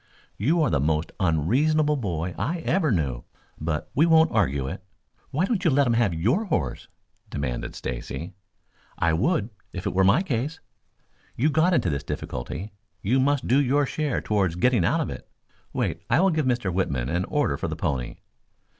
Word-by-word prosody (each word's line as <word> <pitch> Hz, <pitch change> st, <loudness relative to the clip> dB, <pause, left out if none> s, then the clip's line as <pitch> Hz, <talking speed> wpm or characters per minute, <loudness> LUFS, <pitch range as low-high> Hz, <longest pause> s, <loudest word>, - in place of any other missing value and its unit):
"You 155 Hz, -, +2 dB
are -, -, +1 dB
the 70 Hz, -, +2 dB
most 75 Hz, +3 st, 0 dB
unreasonable 135 Hz, -, +2 dB
boy 90 Hz, -, -2 dB
I 170 Hz, +2 st, -2 dB
ever 165 Hz, -3 st, +1 dB
knew. 70 Hz, -, -1 dB, 0.4 s
But 80 Hz, 0 st, -3 dB
we 155 Hz, +5 st, +4 dB
won't 160 Hz, 0 st, +5 dB
argue 70 Hz, -11 st, +1 dB
it." 95 Hz, +6 st, -6 dB, 0.5 s
"Why 160 Hz, +7 st, +1 dB
don't 200 Hz, -2 st, -1 dB
you 170 Hz, -, +4 dB
let 140 Hz, 0 st, +3 dB
him 120 Hz, -, +2 dB
have 115 Hz, -4 st, +2 dB
your 115 Hz, -, +1 dB
horse!" 165 Hz, -6 st, -2 dB, 0.4 s
demanded 65 Hz, -4 st, -3 dB
Stacy. 65 Hz, +8 st, -5 dB, 0.6 s
"I 85 Hz, -1 st, +2 dB
would 115 Hz, -, +1 dB, 0.2 s
if 90 Hz, -1 st, -6 dB
it -, -, -1 dB
were 95 Hz, +1 st, +3 dB
my 100 Hz, -, +4 dB
case. 145 Hz, -1 st, -2 dB, 0.8 s
You 150 Hz, +6 st, +2 dB
got 170 Hz, +4 st, +3 dB
into 90 Hz, -, +1 dB
this 70 Hz, -, -2 dB
difficulty. 75 Hz, -, -5 dB, 0.3 s
You 125 Hz, +7 st, +2 dB
must 140 Hz, 0 st, +1 dB
do 135 Hz, +4 st, +4 dB
your 140 Hz, +2 st, +2 dB
share 150 Hz, -1 st, -1 dB
towards 95 Hz, -5 st, 0 dB
getting 120 Hz, +1 st, +3 dB
out -, -, +2 dB
of -, -, -3 dB
it. -, -, -9 dB, 0.4 s
Wait, -, -, -2 dB
I 120 Hz, -, +4 dB
will 190 Hz, +1 st, +4 dB
give 155 Hz, -4 st, 0 dB
Mr. 120 Hz, -7 st, 0 dB
Whitman 70 Hz, -10 st, -1 dB
an 85 Hz, +5 st, 0 dB
order 145 Hz, -, 0 dB
for -, -, -3 dB
the -, -, -3 dB
pony." 65 Hz, -3 st, -2 dB
115 Hz, 180 wpm, -25 LUFS, -, 0.8 s, won't